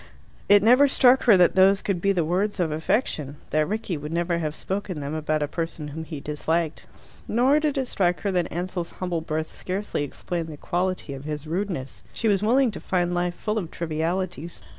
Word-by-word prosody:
It 205 Hz, 0 st, +7 dB
never 250 Hz, +6 st, +6 dB
struck 260 Hz, -1 st, +5 dB
her 220 Hz, -6 st, +7 dB
that 180 Hz, -1 st, +5 dB
those 195 Hz, +1 st, +5 dB
could 190 Hz, -4 st, -1 dB
be 200 Hz, -, +3 dB
the 175 Hz, -4 st, +1 dB
words 190 Hz, +5 st, 0 dB
of 170 Hz, -3 st, +1 dB
affection 155 Hz, -, -1 dB
that 155 Hz, 0 st, +2 dB
Rickie 210 Hz, -4 st, -2 dB
would 150 Hz, +1 st, -7 dB
never 170 Hz, 0 st, 0 dB
have 155 Hz, -2 st, -3 dB
spoken 190 Hz, -3 st, -3 dB
them 140 Hz, +1 st, -4 dB
about 155 Hz, -1 st, 0 dB
a -, -, -1 dB
person 165 Hz, -1 st, -4 dB
whom 160 Hz, +2 st, -6 dB
he 155 Hz, -3 st, -6 dB
disliked. 155 Hz, +3 st, -2 dB, 0.4 s
Nor 260 Hz, +6 st, +3 dB
did 300 Hz, -2 st, 0 dB
it 265 Hz, -2 st, 0 dB
strike 180 Hz, -6 st, +1 dB
her 200 Hz, -, 0 dB
that 180 Hz, -2 st, 0 dB
Ansell's 175 Hz, 0 st, -4 dB
humble 180 Hz, -3 st, -3 dB
birth 155 Hz, 0 st, -3 dB
scarcely 185 Hz, -4 st, -3 dB
explained 165 Hz, +3 st, -4 dB
the 155 Hz, -2 st, -8 dB
quality 180 Hz, -2 st, -2 dB
of 135 Hz, +1 st, -8 dB
his 150 Hz, -1 st, -4 dB
rudeness. 165 Hz, -5 st, -4 dB
She 230 Hz, -, -1 dB
was 200 Hz, -2 st, +3 dB
willing 245 Hz, +3 st, +3 dB
to 205 Hz, -, -7 dB
find 175 Hz, -1 st, 0 dB
life 175 Hz, 0 st, -1 dB
full 215 Hz, +3 st, -2 dB
of 175 Hz, -6 st, -5 dB
trivialities. 170 Hz, +1 st, -3 dB
175 Hz, 205 wpm, -25 LUFS, 155-200 Hz, 0.4 s, It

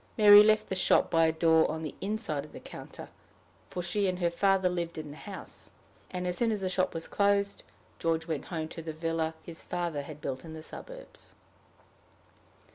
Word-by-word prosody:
Mary 205 Hz, -1 st, +10 dB
left 215 Hz, 0 st, +4 dB
the -, -, -3 dB
shop 185 Hz, -, +3 dB
by 165 Hz, -1 st, +4 dB
a -, -, +3 dB
door 160 Hz, 0 st, +4 dB
on 160 Hz, +1 st, -4 dB
the 155 Hz, -, -5 dB
inside 200 Hz, -8 st, -1 dB
of 150 Hz, -, -14 dB
the -, -, -8 dB
counter, -, -, -10 dB, 0.6 s
for 180 Hz, -, -4 dB
she 195 Hz, +3 st, 0 dB
and 180 Hz, -1 st, -1 dB
her 175 Hz, -2 st, +1 dB
father 195 Hz, +1 st, +3 dB
lived 170 Hz, -2 st, -3 dB
in 155 Hz, -2 st, -6 dB
the -, -, -9 dB
house; 195 Hz, +4 st, -9 dB, 0.4 s
and, 180 Hz, -1 st, -4 dB
as 180 Hz, 0 st, -1 dB
soon 235 Hz, -1 st, +2 dB
as 210 Hz, -2 st, -2 dB
the 185 Hz, -, -1 dB
shop 185 Hz, -1 st, 0 dB
was 165 Hz, -, -3 dB
closed, 200 Hz, 0 st, +1 dB, 0.4 s
George 165 Hz, -1 st, 0 dB
went 160 Hz, -4 st, -3 dB
home 160 Hz, -3 st, -4 dB
to 165 Hz, -, -8 dB
the 160 Hz, -1 st, -6 dB
villa 165 Hz, 0 st, -2 dB
his 170 Hz, -1 st, -6 dB
father 170 Hz, -4 st, -3 dB
had 150 Hz, +1 st, -9 dB
built 130 Hz, -3 st, -4 dB
in 160 Hz, -1 st, -9 dB
the 155 Hz, -, -9 dB
suburbs. -, -, -11 dB
170 Hz, 200 wpm, -30 LUFS, 160-195 Hz, 0.6 s, Mary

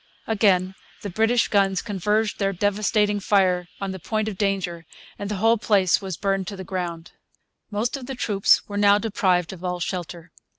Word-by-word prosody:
Again 195 Hz, -4 st, +2 dB, 0.3 s
the 200 Hz, -, -4 dB
British 225 Hz, +5 st, +2 dB
guns 195 Hz, -2 st, +2 dB
converged 210 Hz, +1 st, -1 dB
their 195 Hz, -1 st, 0 dB
devastating 205 Hz, +2 st, +1 dB
fire 185 Hz, -3 st, +2 dB
on 195 Hz, -1 st, -3 dB
the 190 Hz, -, -7 dB
point 215 Hz, +4 st, -2 dB
of 215 Hz, -, -3 dB
danger, 185 Hz, -4 st, -2 dB, 0.3 s
and 200 Hz, -, -4 dB
the 210 Hz, -, -2 dB
whole 225 Hz, +3 st, +3 dB
place 195 Hz, -4 st, +3 dB
was 190 Hz, -4 st, -5 dB
burned 195 Hz, -2 st, -1 dB
to 200 Hz, -, -5 dB
the 190 Hz, -, -7 dB
ground. 175 Hz, -2 st, -5 dB, 0.6 s
Most 220 Hz, +5 st, -1 dB
of 260 Hz, -3 st, -7 dB
the 270 Hz, -, -5 dB
troops 205 Hz, -5 st, +2 dB
were 205 Hz, -, -5 dB
now 205 Hz, 0 st, +5 dB
deprived 190 Hz, -5 st, 0 dB
of 185 Hz, -1 st, -12 dB
all 180 Hz, -1 st, -2 dB
shelter. 175 Hz, -1 st, -5 dB
195 Hz, 180 wpm, -23 LUFS, 185-210 Hz, 0.6 s, now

